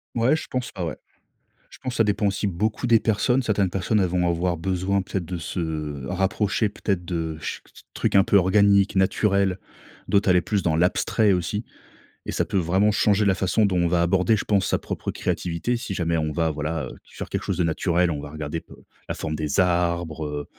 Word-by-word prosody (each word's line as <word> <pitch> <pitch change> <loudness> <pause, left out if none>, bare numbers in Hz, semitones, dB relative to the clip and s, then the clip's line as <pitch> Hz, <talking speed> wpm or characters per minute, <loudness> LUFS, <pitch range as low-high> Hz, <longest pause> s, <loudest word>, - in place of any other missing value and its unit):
Ouais, 120 +6 +3
je - - -5
pense 125 -1 -3
pas, 90 -3 -4
ouais. 80 - -4 0.7
Je - - -14
pense 130 -2 -4
ça 115 - +4
dépend 105 0 +1
aussi 100 +1 -1
beaucoup 105 +6 -1
des 115 -1 +5
personnes. 115 +5 +1
Certaines 100 -4 +1
personnes, 95 +4 0
elles 95 - +2
vont 90 0 0
avoir 85 0 0
besoin, 95 +3 0
peut-être, 95 0 -3
de 90 +2 -4
se 80 -4 -4
rapprocher, 95 +4 0
peut-être, 100 -3 -3
de 80 -3 -3
ch - - -5 0.3
trucs - - -1
un 95 - +7
peu - - +1
organiques, 100 +1 +4
naturels. 95 0 +2 0.5
D'autres, 100 -1 +3
aller 90 -1 +5
plus 100 +3 -1
dans 80 -2 +1
l'abstrait, 95 +5 +2
aussi 95 +4 -2 0.6
et - - -2
ça - - 0
peut - - -6
vraiment 95 +5 +2
changer 105 0 +2
la 100 - +4
façon 95 +3 +1
dont 95 -2 +1
on 85 -1 +2
va 85 0 +2
aborder, 95 +5 +3
je - - -4
pense, 100 -4 +2
sa - - +1
propre - - -5
créativité. 85 +8 -2
Si 115 -5 -4
jamais 85 -2 0
on 75 0 -1
va 80 0 0
voilà, 75 +1 -3
heu, - - -8
sur - - -9
quelque - - -2
chose 95 - -3
de 90 - +2
naturel, 85 +1 +1
on 75 -2 -4
va 75 - -8
regarder 75 +1 -5
pe - - -16 0.4
la - - -2
forme 80 - -4
des 75 -2 -1
arbres, 85 -3 0
heu, 75 -1 -4
90 Hz, 215 wpm, -24 LUFS, 85-100 Hz, 0.7 s, un